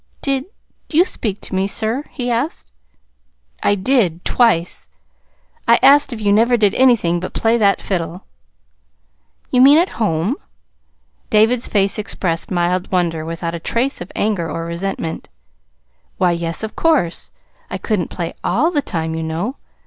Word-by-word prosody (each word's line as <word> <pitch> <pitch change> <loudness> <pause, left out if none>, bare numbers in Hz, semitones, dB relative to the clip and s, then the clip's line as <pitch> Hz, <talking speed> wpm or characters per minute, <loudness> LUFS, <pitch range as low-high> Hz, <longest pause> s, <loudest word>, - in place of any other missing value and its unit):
"Did 275 -1 0 0.4
you 340 +3 +4
speak 215 - -4
to - - -6
me, 190 +1 +1
sir?" 225 +7 -1
he 245 -3 -3
asked. 240 - -3 0.9
"I 205 - +3
did 190 -5 +1
twice. 200 -9 +1 0.8
I - - +6
asked 285 0 +6
if 235 - -5
you 205 -1 +2
never 235 +3 +4
did 210 -3 +3
anything 230 -10 +3
but 185 - -7
play 225 0 +2
that 200 -2 +3
fiddle." 175 -1 -4 1.3
"You 250 - +4
mean 280 +3 +8
at 350 +3 +3
home?" 195 - 0 0.9
David's 225 +3 +3
face 200 0 +1
expressed 175 -5 -2
mild 180 0 -1
wonder 170 -4 0
without 165 +1 -4
a 170 - -4
trace 235 +9 -1
of 175 - -7
anger 195 -6 -1
or 165 - -4
resentment. 170 -1 -4 0.9
"Why, 180 -1 +2
yes, 170 +2 -1
of 220 - -5
course. 300 - +1 0.4
I - - -3
couldn't 205 -7 -1
play 170 -2 -4
ALL 315 +8 +1
the 295 -4 +1
time, 160 -9 -3
you 160 - -3
know. 165 - -3
200 Hz, 150 wpm, -18 LUFS, 170-245 Hz, 1.3 s, mean